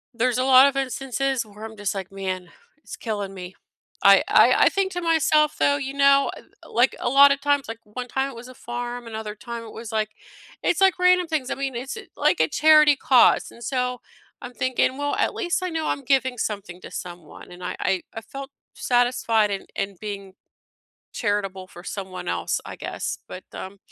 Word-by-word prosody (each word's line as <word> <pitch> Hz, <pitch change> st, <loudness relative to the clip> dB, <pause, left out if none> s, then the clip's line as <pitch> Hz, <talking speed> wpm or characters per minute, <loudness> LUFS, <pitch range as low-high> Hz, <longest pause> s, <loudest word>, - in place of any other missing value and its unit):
There's 250 Hz, +1 st, +1 dB
a 255 Hz, -, +1 dB
lot 260 Hz, +1 st, +7 dB
of 280 Hz, -, -1 dB
instances 270 Hz, -1 st, -1 dB
where 210 Hz, 0 st, -13 dB
I'm 220 Hz, 0 st, -10 dB
just, 205 Hz, -1 st, -2 dB
like, 190 Hz, -1 st, -5 dB
"Man, 190 Hz, -2 st, -5 dB, 0.3 s
it's -, -, -10 dB
killing 205 Hz, -4 st, -4 dB
me," 185 Hz, -1 st, -9 dB, 0.5 s
I -, -, +7 dB
I -, -, +6 dB
I -, -, +6 dB
think 390 Hz, -1 st, -1 dB
to 355 Hz, -, -3 dB
myself, 310 Hz, -2 st, +2 dB
though, 285 Hz, 0 st, +3 dB
you 270 Hz, -1 st, -5 dB
know, 275 Hz, 0 st, +4 dB
at -, -, -13 dB, 0.3 s
like, 245 Hz, +3 st, +3 dB
a -, -, -1 dB
lot 280 Hz, +2 st, +7 dB
of 280 Hz, -, +1 dB
times, 285 Hz, -1 st, +1 dB
like, 225 Hz, 0 st, -6 dB
one 245 Hz, +4 st, -7 dB
time 265 Hz, +2 st, -1 dB
it -, -, -12 dB
was 235 Hz, +2 st, -10 dB
a -, -, -11 dB
farm, 240 Hz, 0 st, -6 dB
another 220 Hz, -1 st, -6 dB
time 235 Hz, +1 st, -7 dB
it 225 Hz, -, -10 dB
was, 230 Hz, 0 st, -8 dB
like, 215 Hz, -1 st, 0 dB, 0.5 s
it's, 355 Hz, -, +1 dB
like, 380 Hz, -1 st, +4 dB
random 360 Hz, -1 st, +4 dB
things, 305 Hz, -5 st, -2 dB
I -, -, -1 dB
mean, 270 Hz, -2 st, -3 dB
it's 255 Hz, -, -5 dB
a -, -, -8 dB
like, -, -, +2 dB
a -, -, +3 dB
charity 305 Hz, -1 st, +6 dB
cause, 255 Hz, -1 st, +4 dB
and 235 Hz, -, -13 dB
so, 250 Hz, 0 st, -1 dB, 0.4 s
I'm 245 Hz, -, -8 dB
thinking, 255 Hz, +2 st, 0 dB
"Well, 290 Hz, 0 st, -1 dB
at -, -, 0 dB
least 355 Hz, -1 st, -1 dB
I 365 Hz, -, -1 dB
know 320 Hz, -2 st, -2 dB
I'm 280 Hz, -, -2 dB
giving 260 Hz, -1 st, +1 dB
something 200 Hz, -5 st, -4 dB
to -, -, -10 dB
someone," 175 Hz, -2 st, -9 dB
and 180 Hz, 0 st, -11 dB
I -, -, -4 dB
I 185 Hz, -2 st, 0 dB
I 225 Hz, -, -6 dB
felt 270 Hz, +5 st, -9 dB, 0.2 s
satisfied 240 Hz, -3 st, +2 dB
in 195 Hz, -, -4 dB
in 195 Hz, 0 st, -3 dB
being 200 Hz, -2 st, -6 dB, 0.8 s
charitable 195 Hz, -3 st, -2 dB
for 175 Hz, -, -13 dB
someone 190 Hz, -2 st, -6 dB
else, -, -, -1 dB
I -, -, -8 dB
guess, -, -, -4 dB
but, -, -, -8 dB
um 190 Hz, +1 st, -8 dB
245 Hz, 210 wpm, -24 LUFS, 210-275 Hz, 0.8 s, lot